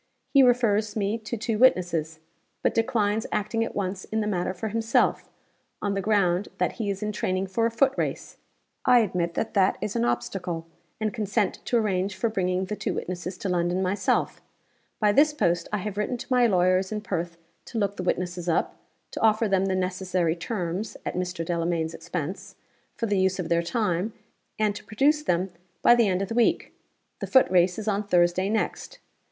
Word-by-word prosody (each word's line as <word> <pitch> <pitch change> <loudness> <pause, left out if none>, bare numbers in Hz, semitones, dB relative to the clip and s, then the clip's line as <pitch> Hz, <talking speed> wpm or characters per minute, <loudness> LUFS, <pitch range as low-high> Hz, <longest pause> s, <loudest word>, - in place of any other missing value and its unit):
He 275 - +7
refers 230 -4 +3
me 210 +1 -1
to 220 +2 -5
two 220 0 -2
witnesses; 175 -10 +3 0.5
but - - +2
declines 225 -2 +1
acting 215 +2 0
at 230 - -5
once 190 -1 -2
in 220 - -2
the 215 - 0
matter 185 -3 -1
for 190 +4 -4
himself, 225 +2 +1 0.5
on 205 -1 -1
the 195 - -1
ground 195 -2 +2
that - - +1
he 220 -4 -4
is 200 +1 -3
in 210 - -1
training 185 -2 -1
for 225 +5 0
a - - -1
foot 265 +4 +2
race. - - -3 0.5
I 250 -1 +6
admit 175 -5 -1
that - - -2
that 195 -3 +3
is 210 - -4
an 115 - +1
obstacle, 165 +8 -2 0.3
and 215 -1 -1
consent 210 -2 -1
to 240 - +2
arrange 195 -3 0
for 205 +5 0
bringing 185 -3 0
the 210 - -4
two - - -3
witnesses 180 +1 -5
to 195 - -4
London 175 +1 0
myself. 190 0 0 0.6
By 210 -2 +4
this 295 +7 +4
post 170 - 0
I 210 - 0
have 200 0 -5
written 245 +4 -1
to 255 - -4
my 245 -1 +5
lawyers 185 -1 +2
in 210 -1 -3
Perth 175 -4 -3 0.3
to 230 - -6
look 200 -2 0
the - - -4
witnesses 180 -1 -2
up; 165 - 0 0.3
to - - -5
offer 220 0 +3
them 195 -1 +2
the 190 - 0
necessary 185 -2 0
terms 180 +1 -4
(at - - -2
Mr. 180 -2 -3
Delamayn's 165 -1 -1
expense) - - -5 0.4
for 230 - -2
the 205 -3 +1
use 190 0 +2
of 180 -3 -4
their 170 0 +3
time; 200 +1 -1 0.4
and 210 -1 +1
to - - -8
produce 275 +9 +2
them 185 - 0 0.3
by - - +8
the 235 -3 +4
end 185 0 +1
of - - -4
the 225 - -4
week. 235 0 +1 0.5
The - - -4
footrace 185 -8 +4
is 220 -1 -5
on 205 0 0
Thursday 180 +1 +3
next. 220 +1 -2
195 Hz, 195 wpm, -26 LUFS, 180-220 Hz, 0.6 s, by